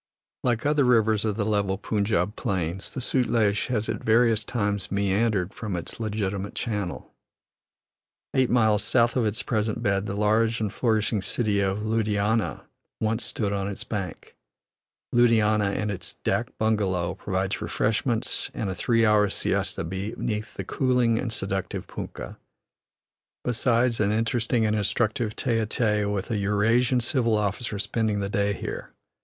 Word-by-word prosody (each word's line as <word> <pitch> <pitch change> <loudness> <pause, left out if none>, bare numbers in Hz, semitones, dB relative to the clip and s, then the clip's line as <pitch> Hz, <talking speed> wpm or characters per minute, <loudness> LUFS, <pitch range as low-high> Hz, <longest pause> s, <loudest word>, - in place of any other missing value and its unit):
Like 120 -1 0
other 145 -1 +3
rivers 110 -3 +3
of 105 -2 0
the 105 -1 -1
level 100 -2 +1
Punjab 105 -1 0
plains, 90 0 -2
the 130 - -5
Sutlej 115 -5 +1
has 110 -4 -1
at 110 -1 -3
various 115 -1 +4
times 100 -4 -2
meandered 100 -1 +1
from 105 -5 -4
its 85 - -6
legitimate 100 -3 -2
channel; 105 -6 -3 1.2
eight 130 -2 +3
miles 110 -4 +3
south 120 -2 +3
of 120 -4 +2
its 105 +3 -2
present 110 -2 -1
bed 100 0 +1
the 100 - -3
large 110 +2 +2
and 105 -3 -2
flourishing 110 -3 +1
city 105 -1 0
of 100 +1 0
Ludhiana 110 0 0 0.4
once 110 +1 0
stood 100 -3 -2
on 100 -1 -1
its 100 - -4
bank. 100 -4 -5 0.8
Ludhiana 110 -4 +3
and 105 -1 -1
its 95 - -5
dak - - -1
bungalow, 100 -6 +1
provides 95 0 -2
refreshments 110 +2 0
and 100 -3 -2
a - - -2
three 115 +5 +2
hours' 105 -2 +3
siesta - - -1
beneath 105 +5 -4
the - - -4
cooling 125 -3 +2
and 120 - -2
seductive 95 -2 -3
punkah, - - -7 1.1
besides 120 0 +2
an 105 -1 +2
interesting 115 +1 +1
and 105 0 +1
instructive 110 +2 0
tete 115 -4 0
a - - 0
tete 105 -2 +1
with 100 +2 -2
a 110 - +1
Eurasian 115 +5 +2
civil 115 -2 +1
officer 105 +1 -2
spending 105 +1 0
the 100 0 -2
day 100 -1 +1
here. - - -6
110 Hz, 150 wpm, -26 LUFS, 100-115 Hz, 1.2 s, various